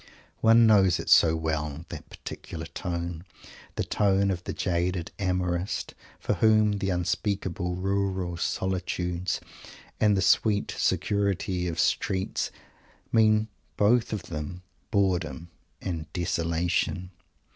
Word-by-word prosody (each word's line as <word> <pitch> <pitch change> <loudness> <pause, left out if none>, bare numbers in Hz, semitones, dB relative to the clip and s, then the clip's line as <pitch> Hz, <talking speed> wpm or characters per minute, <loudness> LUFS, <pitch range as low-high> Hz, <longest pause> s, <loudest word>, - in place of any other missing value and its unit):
One 115 +1 +6
knows 100 -5 +5
it - - -5
so 80 -1 +7
well, 80 -1 -2
that - - -8
particular 80 0 -7
tone; 85 0 -4 0.5
the - - 0
tone 100 -1 +2
of 90 -1 -3
the - - -3
jaded 90 -1 -1
amorist, 90 -1 -1 0.3
for - - 0
whom 110 -2 +3
"the 95 - -1
unspeakable 90 0 -1
rural 95 -1 -1
solitudes" 90 0 -1 0.6
and 105 -2 +4
"the 95 - +2
sweet 105 0 +3
security 100 -3 0
of 85 - -3
streets" 95 0 0 0.6
mean, 110 -1 +4 0.3
both 115 +3 +3
of 105 -4 -3
them, 85 +3 -6 0.3
boredom 90 - 0 0.3
and 80 -4 -4
desolation. 85 +1 -1
90 Hz, 115 wpm, -27 LUFS, 85-100 Hz, 0.6 s, so